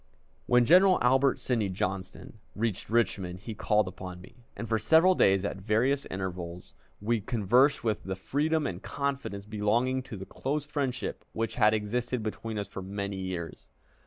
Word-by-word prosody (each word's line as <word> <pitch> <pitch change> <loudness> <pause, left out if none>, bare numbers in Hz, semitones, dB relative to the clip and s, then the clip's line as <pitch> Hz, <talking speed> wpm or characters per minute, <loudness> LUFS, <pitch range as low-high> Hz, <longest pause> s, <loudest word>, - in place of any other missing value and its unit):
When 125 0 +5
General 185 +6 +6
Albert 130 +2 +4
Sidney 115 -6 -1
Johnston 95 +3 -4 0.2
reached 110 -2 -2
Richmond 95 -6 0
he 110 - -6
called 105 -1 +1
upon 90 -1 -7
me, 120 +6 -17
and 115 - -5
for 110 0 +1
several 160 - +5
days 95 - +3
at 100 - -3
various 115 +8 +1
intervals 90 -2 -6 0.3
we 115 +2 0
conversed 120 +7 +3
with 110 -3 -1
the 95 0 -3
freedom 150 +10 0
and - - -4
confidence 135 -8 -3
belonging 115 +5 0
to 120 -4 -8
the 95 - -7
close 145 +7 -3
friendship 140 -4 -3
which 115 0 -2
had 110 -2 +4
existed 120 +3 -2
between 110 0 -4
us 100 -2 -3
for 95 - -7
many 100 +1 -4
years. 90 -3 -5
110 Hz, 160 wpm, -29 LUFS, 95-130 Hz, 0.3 s, General